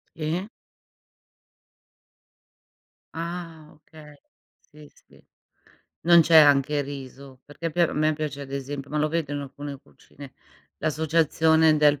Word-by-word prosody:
Sì. 165 +5 -3 2.7
Ah, 165 -2 -7
okay. 150 -1 -16 0.5
Sì, 150 -1 -15
sì. - - -24 0.8
Non 170 0 +6
c'è 165 0 +4
anche 145 -1 +5
riso, 135 -1 -10
perché 155 +3 -6
pi 175 - -3
a 170 - +2
me 155 +1 +1
piace 150 -2 -5
ad 135 -1 -10
esempio 140 0 -6
ma 150 - -2
lo 150 +1 +1
vedo 160 -2 -3
in 145 - -3
alcune 140 0 -8
cucine, 140 -2 -16 0.4
l'associazione 160 0 +2
del 145 -1 +3
150 Hz, 120 wpm, -24 LUFS, 145-160 Hz, 2.7 s, Non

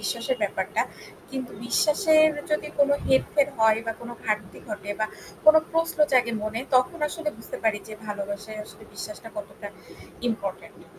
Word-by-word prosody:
বিশ্বাসের - - -1
ব্যাপারটা। - - 0 0.5
কিন্তু 260 -2 -4
বিশ্বাসের 310 +4 +5 0.2
যদি 300 0 0
কোন 285 0 +5 0.2
হেরফের 275 +2 +3
হয় 220 0 +5
বা 225 - 0
কোনো 240 0 -7
ঘাটতি 210 -3 -2
ঘটে 205 -1 -5
বা 215 - +2 0.4
কোন 310 0 +9 0.2
প্রশ্ন 330 -1 0
জাগে 245 -2 +4
মনে 215 +2 -2 0.2
তখন 255 +7 +2
আসলে 325 -2 -3
বুঝতে 225 - -7
পারি 215 -2 +3
যে 215 - -7
ভালোবাসায় 205 +1 -5
আসলে 215 - -14
বিশ্বাসটা 210 +2 -7
কতটা 310 - -7 0.6
ইম্পোর্টেন্ট। 200 -4 -5
230 Hz, 150 wpm, -26 LUFS, 215-300 Hz, 0.6 s, কোন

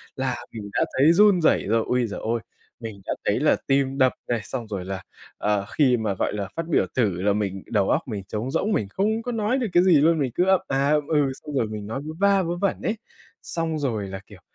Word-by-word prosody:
là 130 -2 -1 0.2
mình 105 -2 -7
đã - - +2
thấy 145 +5 +6
run 200 -1 +5
rẩy - - +3
rồi. 115 +1 +2
Ôi 125 -1 +1
giời 105 - -6
ơi, 115 +1 -1 0.4
mình 110 -4 -8
đã - - -1
thấy - - +2
là - - +3
tim 135 0 +1
đập 130 -2 +4 0.2
này, 120 - +1
xong 120 -4 -5
rồi 95 -4 -5
là, 95 -1 -4 0.4
ờ, 105 -1 0
khi 130 -5 +4
mà, 110 -3 -1
gọi 95 - -1
là, 100 -2 -3
phát 165 0 -3
biểu 165 - +2
thử 100 -8 +1
là 100 +1 +2
mình 100 -2 -2
đầu 100 -4 +2
óc - - +2
mình 105 -5 -4
trống 110 +6 -3
rỗng, 190 +8 0
mình 100 - 0
không 215 - 0
có 245 - -3
nói 225 +2 0
được 240 - -1
cái 175 - +5
gì 175 -6 +5
luôn, 160 +1 +4
mình 130 -4 0
cứ 180 - +2
ậm 190 -1 +4
à 135 +1 +1
ậm 150 -1 +2
ừ, 145 -4 +2
xong 145 +2 -9
rồi 115 -4 +1
mình 105 -1 -6
nói 125 +5 -4
vớ 155 - -5
va 200 -1 +4
vớ 170 +1 -2
vẩn 200 +2 -1
ấy. 220 - -1 0.4
Xong 160 -2 -3
rồi 110 -8 -2
là, 95 0 -6
kiểu, - - -14
130 Hz, 255 wpm, -24 LUFS, 105-165 Hz, 0.4 s, thấy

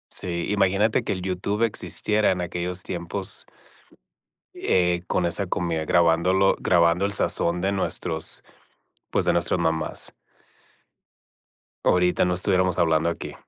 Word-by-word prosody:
Sí, 85 -2 -4
imagínate 105 +3 +2
que 105 - -1
el 95 - -5
YouTube 95 +4 -2
existiera 110 -1 0
en 90 -1 -1
aquellos 90 +1 -4
tiempos 90 +2 -6 1.1
eh, 90 -1 +1
con 90 - 0
esa 95 +3 -2
comida 85 -3 -2
grabándolo 85 +3 +3
grabando 85 +1 +3
el 100 - -2
sazón 85 -2 -1
de 95 +2 +1
nuestros, 85 -4 -4 0.7
pues, - - +1
de - - +3
nuestras - - 0
mamás. 80 -1 -2 1.7
Ahorita 90 0 +3
no 90 0 +1
estuviéramos 95 -1 +1
hablando 80 0 +2
aquí. 85 - -5
90 Hz, 125 wpm, -24 LUFS, 85-95 Hz, 1.7 s, grabándolo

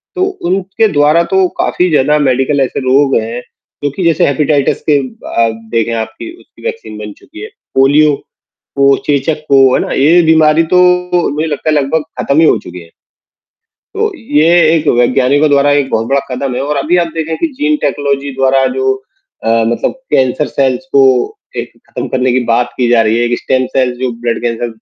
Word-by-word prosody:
तो 370 - 0 0.3
उनके 195 +3 0
द्वारा 150 +3 +3
तो 190 -1 +3
काफ़ी 180 0 0
ज़्यादा 150 +1 +2
मेडिकल 135 +1 +1
ऐसे 130 - -1
रोग 135 +1 +3
हैं, 115 +2 -6 0.4
जो 145 - 0
कि 185 - -3
जैसे 165 -2 +2
हेपेटाइटिस 140 0 0
के 145 - +4 0.5
आप 115 -1 0 0.2
देखें 115 0 0
आप 110 0 -4
कि 335 - -7
उसकी - - -21
वैक्सीन 460 - -6
बन 105 -1 -7
चुकी 320 +6 -14
है। 425 - -6 0.3
पोलियो 145 +2 +4 0.6
को, 140 0 +4
चेचक 150 +2 0
को, 135 -1 +5 0.2
है - - +1
ना? - - -4
ये 160 +6 +4
बीमारी 160 0 +4
तो - - +6 0.5
मुझे 155 +2 -2
लगता 150 0 -3
है 155 - +2
लगभग 145 +3 0 0.2
खत्म 140 +2 +1
ही 165 - +5
हो - - +3
चुकें 90 0 -9
हैं। 85 - -17 1.0
तो, 430 +1 -1
ये 155 - +1 0.3
एक 155 -1 -2
वैज्ञानिकों 130 +4 +2
द्वारा 145 0 +3
एक 135 -2 -1
बहुत 115 +1 -1
बड़ा 140 0 +1
कदम 130 0 -3
है - - -3
और 145 +1 -2
अभी 155 +6 0
आप - - -6
देखें 160 0 -3
कि - - 0
जीन 300 +3 0
टेक्नोलॉजी 140 -1 -1
द्वारा 135 0 +2
जो 400 0 +1 0.5
अ, - - -1 0.2
मतलब 120 - -1 0.2
कैंसर 130 +3 +1
सेल्स 135 +4 -1
को 140 - +5 0.5
एक - - -5
खत्म - - -6
करने 130 -1 0
की 130 - +1
बात 120 +1 +1
की 125 -2 0
जा 120 -1 +4
रही 110 0 +1
है। 120 - +1
एक 120 - -1
स्टेम 130 0 0
सेल्स 125 -2 +1
जो 130 -1 -2
ब्लड 120 -1 -1
कैंसर 120 0 -2
140 Hz, 195 wpm, -12 LUFS, 125-155 Hz, 1.0 s, तो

